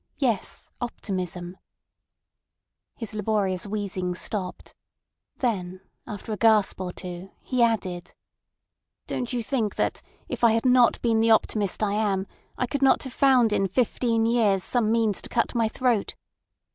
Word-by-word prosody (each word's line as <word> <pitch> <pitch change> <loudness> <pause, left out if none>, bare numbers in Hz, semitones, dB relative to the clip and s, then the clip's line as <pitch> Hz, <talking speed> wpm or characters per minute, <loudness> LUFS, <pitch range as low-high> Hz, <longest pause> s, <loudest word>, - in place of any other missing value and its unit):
Yes, 245 -7 -2
optimism— 185 -6 -4 1.4
His 225 -2 -6
laborious 205 -3 -1
wheezing 195 -3 -3
stopped, 185 -1 -4 0.6
then, 185 -7 -2 0.3
after 215 0 -6
a - - -3
gasp 215 -3 +3
or 180 -1 -3
two, 180 +1 -8
he 255 -2 -1
added: 185 -7 0 0.9
"Don't 245 - -3
you 245 -2 -2
think 225 -4 -1
that, - - -1 0.3
if - - -5
I 230 -2 +6
had 225 +3 0
not 250 -2 +5
been 230 -2 +3
the 225 +1 +3
optimist 215 -2 +2
I 205 -1 +1
am, 200 -3 0 0.3
I 250 - 0
could 275 +3 -3
not 270 - +4
have 265 -3 -6
found 255 -6 +4
in 195 -1 +2
fifteen 230 +1 +1
years 220 -5 +2
some 230 -3 +1
means 225 -3 +1
to - - -8
cut 235 - 0
my 230 -2 +2
throat? 235 -1 0
220 Hz, 145 wpm, -25 LUFS, 195-235 Hz, 1.4 s, I